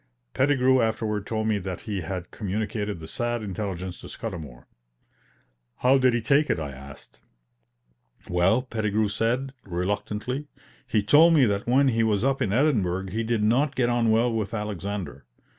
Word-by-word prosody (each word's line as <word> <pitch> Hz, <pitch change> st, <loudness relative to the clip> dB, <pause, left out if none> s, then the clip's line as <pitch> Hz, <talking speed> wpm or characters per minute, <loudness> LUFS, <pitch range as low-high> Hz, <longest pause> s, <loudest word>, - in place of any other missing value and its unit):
Pettigrew 130 Hz, -2 st, +3 dB
afterward 110 Hz, -2 st, -1 dB
told 110 Hz, -1 st, -1 dB
me 105 Hz, -2 st, +1 dB
that 95 Hz, -2 st, -5 dB
he 105 Hz, -4 st, -4 dB
had 90 Hz, +1 st, -5 dB
communicated 105 Hz, 0 st, -3 dB
the 80 Hz, -1 st, -9 dB
sad 120 Hz, +4 st, -2 dB
intelligence 95 Hz, -3 st, -5 dB
to -, -, -9 dB
Scudamour. 70 Hz, -8 st, -7 dB, 1.1 s
"How 130 Hz, +2 st, +3 dB
did 130 Hz, -2 st, +3 dB
he 120 Hz, -, 0 dB
take 140 Hz, +6 st, +3 dB
it?" -, -, +1 dB
I 75 Hz, -3 st, -4 dB
asked. 70 Hz, +1 st, -13 dB, 1.1 s
"Well," 90 Hz, +8 st, +2 dB
Pettigrew 110 Hz, -3 st, -1 dB
said, 120 Hz, +6 st, -1 dB
reluctantly, 105 Hz, +9 st, -3 dB, 0.4 s
"he 105 Hz, -2 st, +1 dB
told 160 Hz, +10 st, +6 dB
me 140 Hz, -4 st, +6 dB
that 100 Hz, +1 st, -1 dB
when 135 Hz, +3 st, +4 dB
he 115 Hz, -2 st, +1 dB
was 110 Hz, -2 st, +1 dB
up 135 Hz, 0 st, +1 dB
in 95 Hz, -, 0 dB
Edinburgh 100 Hz, -, +1 dB
he 110 Hz, -, -1 dB
did 115 Hz, -1 st, 0 dB
not 130 Hz, +7 st, +2 dB
get 120 Hz, -2 st, +1 dB
on 120 Hz, -1 st, +2 dB
well 115 Hz, +2 st, +3 dB
with 110 Hz, -1 st, -2 dB
Alexander. 100 Hz, -, -5 dB
110 Hz, 160 wpm, -25 LUFS, 95-120 Hz, 1.1 s, told